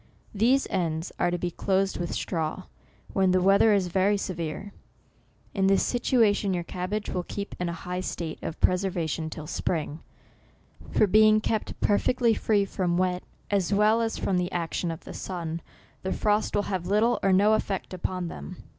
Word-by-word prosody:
These 245 +6 +3
ends 165 -2 -1
are 175 - +3
to 175 - -1
be 175 0 -2
closed 195 +2 0
with 175 -1 -3
straw, 165 +2 -2 0.5
when 190 -1 +3
the 185 0 +4
weather 195 +4 +5
is 200 -3 +3
very 190 +3 +2
severe. 185 +1 -4 0.8
In 195 -1 +2
this 195 0 +4
situation 215 -6 +2
your 175 - -2
cabbage 185 +5 -4
will 180 - -1
keep 200 +3 -6
in 180 -1 -1
a 165 -1 -7
high 180 0 -2
state 170 -3 -4
of 160 - -5
preserva 180 -2 +1
tion 160 +1 -3
till 155 -1 -7
spring; 155 -1 -2 0.9
for - - +4
being 215 +2 +5
kept 220 0 -2
perfectly 230 +3 +3
free 210 -2 +2
from 180 -3 -1
wet, 180 0 +1 0.3
as 195 -2 +1
well 210 +3 +4
as 225 -1 -1
from 185 -2 0
the 180 +1 -2
action 170 0 -2
of 165 -1 -6
the - - -9
sun, 170 -3 -4 0.4
the 190 - -3
frost 210 0 +1
will 205 - +2
have 185 -4 -3
little 215 +5 +2
or 195 - +3
no 205 +3 +5
effect 195 -3 -2
upon 185 0 -3
them. 70 - -8
185 Hz, 180 wpm, -27 LUFS, 175-205 Hz, 0.9 s, weather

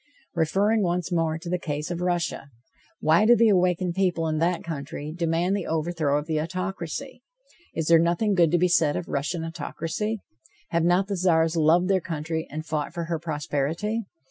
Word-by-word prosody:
Referring 195 +7 +2
once 180 -1 -1
more 165 -2 +1
to 165 - -10
the 180 +1 -1
case 150 0 -4
of 175 0 -3
Russia: 175 -5 -1 0.5
Why 160 +6 +4
do 235 +2 +7
the 230 -1 +5
awakened 180 -2 +2
people 175 -3 +1
in 155 -1 -1
that 170 +1 +1
country 150 -1 -5
demand 170 +2 +1
the 200 - -3
overthrow 160 -2 0
of 150 - -3
the 155 -1 0
autocracy? 185 - -5 0.5
Is 160 - -1
there 165 +1 +6
nothing 175 +6 +2
good 170 -4 +4
to 175 - +3
be 180 +1 +3
said 160 -4 +3
of 175 - -4
Russian 155 +4 -2
autocracy? 170 +6 -3 0.5
Have 170 -1 +1
not 180 +2 +3
the 200 -1 -3
Czars 165 -2 +2
loved 165 +3 +4
their 190 -1 +2
country 160 -2 -3
and 155 +2 -6
fought 155 +1 -3
for 170 - -2
her 165 -1 -2
prosperity? 165 +7 -2
170 Hz, 185 wpm, -25 LUFS, 160-180 Hz, 0.5 s, do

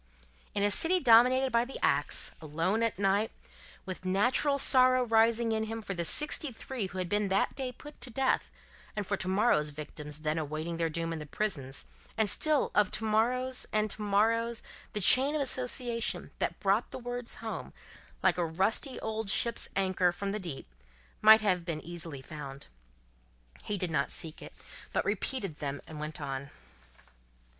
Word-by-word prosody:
In 200 - +1
a 205 - +3
city 350 - +4
dominated 255 0 +5
by 235 0 +3
the 260 +2 -7
axe, - - +1
alone 165 +8 -1
at 230 -4 0
night, 200 +2 +2 0.6
with 185 -1 -6
natural 245 +9 +2
sorrow 255 -2 +5
rising 230 0 +3
in 220 0 0
him 225 0 -5
for 195 - -4
the 175 -2 -2
sixty 300 - +1
three 235 -2 -4
who 185 - -9
had 185 -1 -2
been 205 +2 +1
that 195 +1 +1
day 260 -2 -3
put 295 +3 -13
to 245 - -2
death, 265 +2 0 0.5
and 210 -1 -2
for 200 - 0
to 190 - -4
morrow's 190 -6 +2
victims 150 0 -7
then 155 +1 0
awaiting 155 +2 -4
their 165 -1 0
doom 165 +1 -3
in 160 - -5
the 150 - -8
prisons, 140 -8 -3 0.3
and 220 -1 +3
still 305 +5 +2
of 210 -2 +3
to - - -3
morrow's 250 +4 +1
and 215 -1 +1
to - - -6
morrow's, 225 +3 +1 0.3
the 210 - -2
chain 270 - +5
of 300 - 0
association 250 -3 -1
that - - -2
brought 200 +3 +1
the - - -7
words 245 -1 -6
home, 225 -1 -6 0.5
like - - +3
a - - +2
rusty 200 - 0
old 220 -1 -3
ship's 235 +4 +1
anchor 185 -2 +2
from 195 +3 -4
the 210 - -3
deep, 170 -8 -6 0.6
might 220 +1 +8
have 185 -4 +1
been 165 -3 -3
easily 165 -5 -7
found. 140 -2 -8 1.0
He 205 - -2
did 180 -3 -1
not 140 -4 0
seek 160 -1 -5
it, - - -10 0.4
but - - 0
repeated 205 - -2
them 140 -1 -4
and 155 -1 -9
went 150 +1 -5
on. 140 -1 -5
205 Hz, 180 wpm, -30 LUFS, 170-235 Hz, 1.0 s, might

